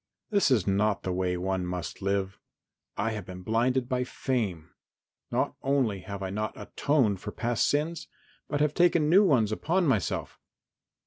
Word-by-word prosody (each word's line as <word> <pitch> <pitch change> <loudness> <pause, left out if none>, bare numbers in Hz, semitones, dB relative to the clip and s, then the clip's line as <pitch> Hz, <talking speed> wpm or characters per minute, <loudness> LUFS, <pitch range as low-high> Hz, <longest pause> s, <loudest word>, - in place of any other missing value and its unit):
This 200 -7 +3
is 115 -9 +3
not 100 +1 +1
the 95 - -1
way 90 0 0
one 95 +1 -1
must 90 -2 -5
live. 100 0 -1 0.6
I 115 +3 0
have 110 -2 -4
been 90 0 -9
blinded 120 +4 +1
by 125 -1 0
fame. 110 -11 -2 0.6
Not - - 0
only 135 -8 +1
have 100 +1 -7
I 95 - -3
not 105 +2 -3
atoned 130 -10 +1
for - - -5
past 120 -2 0
sins 155 +3 -1 0.4
but 145 -1 -1
have 150 -1 +2
taken 170 -3 +3
new 195 +4 +7
ones 120 - +3
upon 170 +11 +1
myself. 115 - -1
110 Hz, 165 wpm, -28 LUFS, 95-140 Hz, 0.6 s, new